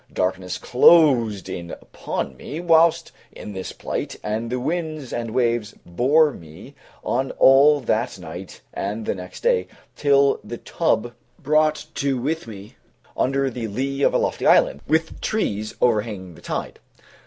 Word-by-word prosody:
Darkness 90 0 -2
closed 125 - +4
in 85 -1 -6
upon 70 -4 -5
me 145 - -7
while 165 -1 +5 0.4
in 105 - -9
this 95 -1 -6
plight, - - -5
and 110 +2 -3
the 125 +1 -2
winds 155 -1 -3
and 115 -1 -3
waves 120 -2 0
bore 140 - +3
me 85 - -13 0.3
on 130 +2 -1
all 140 +3 +6
that 115 -2 -1
night 90 +1 -9
and 105 +3 -4
the - - 0
next 90 -1 -10
day, 90 0 +2 0.3
till 140 -1 +3
the 120 +3 -7
tub 120 -8 -1 0.2
brought 155 0 +1
to 135 -2 -1
with 155 +3 -3
me 105 -2 -11 0.4
under 135 +1 +1
the 115 -1 -4
lee 135 +6 -3
of - - +3
a - - +5
lofty - - -1
island, 70 - +4
with 160 +1 0
trees 110 - -2
overhanging 105 -6 0
the - - -16
tide. - - -5
120 Hz, 150 wpm, -22 LUFS, 100-145 Hz, 0.4 s, all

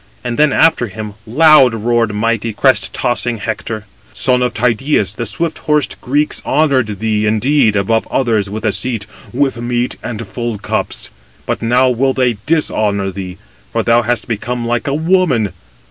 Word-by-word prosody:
And 120 +1 -3
then 150 -1 +4
after 160 -6 +3
him 105 +1 -7
loud 135 -1 +5
roared 115 0 +1
mighty 115 +1 -1
crest 105 -6 +2
tossing 120 0 -1
Hector: 110 0 -4 0.3
"Son 125 -1 +2
of 125 - +1
Tydeus, 115 -3 +1
the 120 +2 -3
swift 165 -1 -2
horsed 150 -2 0
Greeks 145 +4 +1
honoured 130 -9 +1
thee, 105 -1 0
indeed, 110 +1 +2
above 110 +3 +1
[others] 110 -6 0
with 110 +2 -5
a 110 - +3
seat, 115 -2 -2 0.3
with 130 -2 0
meat, 120 +1 -1
and 115 -1 -5
full 115 +2 -4
cups; 100 - -3 0.3
but - - -2
now 125 +3 +3
will 130 +2 +1
they 125 -4 +1
dishonour 105 -11 +1
thee; 90 -1 -7 0.3
for 115 - 0
thou 115 +1 +4
hast 120 -1 -1
become 120 +1 -3
like 120 0 -1
a 140 - 0
woman. 160 - +1
120 Hz, 160 wpm, -15 LUFS, 110-130 Hz, 0.3 s, loud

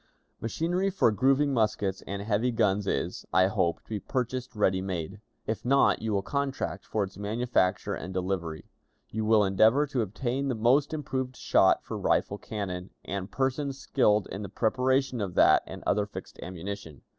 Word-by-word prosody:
"Machinery 175 - 0
for 185 - +3
grooving 135 +5 +2
muskets 105 -4 0
and 100 0 -4
heavy 110 +3 +1
guns 100 -3 +1
is, 90 -1 -2
I 95 - +5
hope, 95 -4 0
to - - -30
be 110 -2 -2
purchased 130 +2 -3
ready 95 -3 +2
made. 95 +1 -4 0.2
If 110 - -3
not, 135 +2 +3
you 110 0 -2
will 100 -1 0
contract 140 +3 -2
for 105 - 0
its 95 0 -8
manufacture 105 -3 0
and 90 - -5
delivery. 90 -4 -3 0.4
You 110 0 -2
will 110 -1 +5
endeavor 110 +9 +4
to 135 -4 -1
obtain 120 +6 -2
the 130 - 0
most 125 +6 +3
improved 130 -4 -3
shot - - +3
for - - -5
rifled 100 - 0
cannon, 95 -4 -5 0.2
and 100 0 -4
persons 135 +1 -1
skilled 105 -8 +2
in 100 - -5
the 100 - -6
preparation 130 +3 +1
of 95 -3 -3
that - - +6
and - - -8
other 105 0 +1
fixed - - -9
ammunition. 90 -3 -7
110 Hz, 170 wpm, -28 LUFS, 95-130 Hz, 0.4 s, that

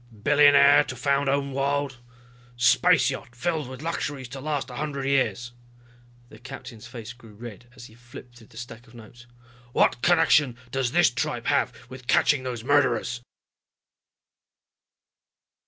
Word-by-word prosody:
"Billionaire 145 0 +6
to 130 - -7
found 140 +2 0
own 140 0 -1
world... 140 -1 -2 0.6
space 120 - +4
yacht 120 - -8
filled 160 +1 -2
with 130 +2 -9
luxuries 145 -5 -4
to 135 +2 -8
last 145 -3 -3
a 125 - -8
hundred 140 -2 -4
years," 130 -3 0 0.8
the 110 - -15
captain's 120 -2 -10
face 120 -2 -9
grew 115 -3 -17
red 120 +1 -11
as 120 - -12
he 110 - -15
flipped 120 +1 -14
through 110 - -17
the 110 - -18
stack 120 0 -10
of 115 - -18
notes. 120 +1 -15 0.5
"What 120 - +2
connection 160 -7 +3
does 130 -2 -1
this 165 -3 +4
tripe 125 - -3
have - - +1 0.2
with 130 -1 -12
catching 140 -3 +3
those 125 -3 -5
murderers?" 120 -4 +1
130 Hz, 145 wpm, -25 LUFS, 120-140 Hz, 0.8 s, Billionaire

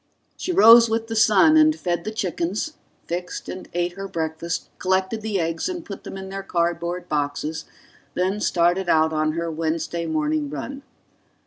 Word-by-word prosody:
She 370 - -3
rose 235 - +8
with 225 0 -1
the 225 - -3
sun 240 +9 +5
and 310 0 +5
fed 175 -1 -2
the 215 - -3
chickens, 205 - -2 0.3
fixed 180 +1 -5
and 185 - -7
ate 175 0 -1
her 195 +2 -7
breakfast, 160 -1 -3
collected 190 +3 0
the 210 -3 -1
eggs 165 - -1
and 350 -2 -5
put 200 - -9
them - - -7
in 190 0 -7
their 195 0 -5
cardboard 170 -1 -2
boxes, 150 +2 -2 0.5
then 190 +3 0
started 175 +1 +1
out 160 0 +3
on 155 0 +1
her 170 0 -2
Wednesday 165 +1 -2
morning 155 -2 -1
run. 260 - -6
175 Hz, 170 wpm, -23 LUFS, 165-215 Hz, 0.5 s, rose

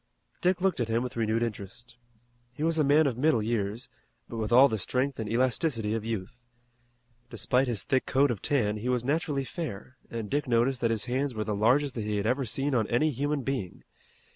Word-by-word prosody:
Dick 180 0 +2
looked 190 -5 +1
at 120 - 0
him 115 +2 0
with 125 0 -5
renewed 115 0 +1
interest. 115 +2 -6 0.6
He 145 - -5
was 165 0 +1
a - - +4
man 150 +3 +5
of 125 -4 -1
middle 135 -6 +3
years, 110 +1 -2 0.4
but 115 - -7
with 110 0 -2
all 130 +4 +8
the 110 -4 -2
strength 130 +7 -1
and 110 -2 -3
elasticity 120 -2 +1
of 110 -1 -2
youth. 115 +2 -5 0.9
Despite 125 +4 +1
his 115 -6 -1
thick 130 -2 0
coat 140 0 +3
of 110 - -4
tan 110 -8 +1
he 115 +4 -3
was 125 -1 0
naturally 145 -1 0
fair, 130 - -6
and 115 -2 -4
Dick 145 +5 -1
noticed 120 +2 +2
that 115 - +2
his 115 -1 -1
hands 130 +1 -1
were 110 - -1
the 105 0 -2
largest 125 +7 +2
that 115 - -4
he 105 0 -1
had 100 - -1
ever 130 +4 +1
seen 135 +5 -2
on 110 -4 +2
any 140 +6 +2
human 145 +2 -1
being. 125 -10 -4
125 Hz, 215 wpm, -28 LUFS, 110-140 Hz, 0.9 s, all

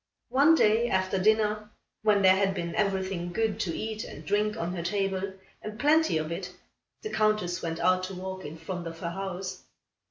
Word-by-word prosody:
One 290 +5 +5
day, 230 -3 +3
after 190 0 +1
dinner, 215 +1 +2 0.3
when 210 -2 +3
there 190 0 +7
had 195 0 +1
been 170 -2 -3
everything 190 -3 -1
good 220 +2 0
to 175 -7 -2
eat 220 0 -3
and 150 - -10
drink 210 +5 +1
on 175 -4 -2
her 170 - -3
table, 195 +1 -1 0.3
and 215 +1 -7
plenty 310 - +4
of 155 +1 -3
it, 180 +1 -4 0.5
the 430 - -4
Countess 215 -5 +1
went 165 -1 -3
out 185 0 +3
to 190 0 -7
walk 190 +1 -6
in 150 +2 -7
front 175 +1 -5
of 165 0 -7
her 170 0 -4
house. 190 0 -5
190 Hz, 190 wpm, -28 LUFS, 175-215 Hz, 0.5 s, there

